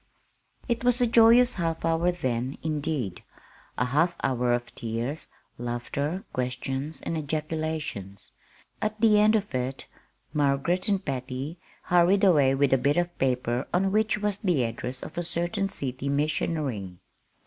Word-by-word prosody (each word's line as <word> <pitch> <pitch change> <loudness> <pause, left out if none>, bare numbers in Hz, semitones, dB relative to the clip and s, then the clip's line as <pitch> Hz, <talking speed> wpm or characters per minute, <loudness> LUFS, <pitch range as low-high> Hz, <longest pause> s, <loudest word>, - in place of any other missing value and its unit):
It 235 -1 -1
was 245 0 +4
a 245 - +4
joyous 235 +2 +6
half 165 -2 -1
hour 165 +2 +2
then, 130 -6 -2
indeed 150 - -2 0.6
a 125 - +2
half 160 +7 +2
hour 125 -2 +1
of 120 0 -1
tears, 120 +6 -3 0.3
laughter, 140 - -3
questions, 130 +4 -3
and 165 - -2
ejaculations. 155 - -4 0.5
At 215 0 -2
the 215 -2 +5
end 215 +1 +5
of 205 -6 -1
it 130 +1 -3 0.5
Margaret 150 +6 +1
and 200 -2 +1
Patty 135 +4 -4 0.2
hurried 180 +3 +4
away 145 -8 +5
with 135 -1 +3
a 135 - +4
bit 145 +5 +2
of 175 0 0
paper 125 -1 0
on 190 +2 +2
which 215 +1 +2
was 210 -1 -1
the 175 -10 +1
address 120 +2 -4
of 175 - -6
a - - -1
certain 175 +4 -1
city 135 -6 -4
missionary. 140 - -1
150 Hz, 145 wpm, -27 LUFS, 130-180 Hz, 0.6 s, joyous